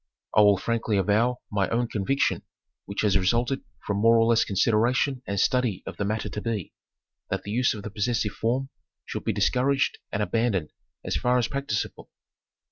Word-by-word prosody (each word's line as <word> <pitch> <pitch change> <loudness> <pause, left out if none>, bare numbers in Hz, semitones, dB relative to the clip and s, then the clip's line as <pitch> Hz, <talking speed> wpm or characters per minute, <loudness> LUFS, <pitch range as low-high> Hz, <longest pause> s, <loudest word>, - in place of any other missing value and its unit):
I 105 - +7
will 105 -1 +6
frankly 115 0 -1
avow 110 +6 +2
my 100 -2 +1
own 120 +1 0
conviction 115 +7 0 0.5
which 100 +1 -3
has 100 -2 +3
resulted 120 +8 +1 0.2
from 100 - -1
more 115 +2 +5
or 115 - +4
less 115 -1 +4
consideration 120 +6 +1
and 100 -1 -1
study 125 -6 +1
of 95 -3 -7
the 105 - -1
matter 110 +2 -2
to 105 - -5
be, 110 -6 -3 0.6
that - - -2
the 100 - -6
use 125 +2 +2
of 105 - -8
the 105 - -6
possessive 110 0 0
form 130 +4 -1 0.4
should - - -5
be - - +2
discouraged 135 +2 +1
and 105 0 0
abandoned 105 -8 0 0.3
as - - -1
far 125 0 +2
as 120 -2 +1
practicable. 140 -7 -3
115 Hz, 180 wpm, -26 LUFS, 100-125 Hz, 0.6 s, I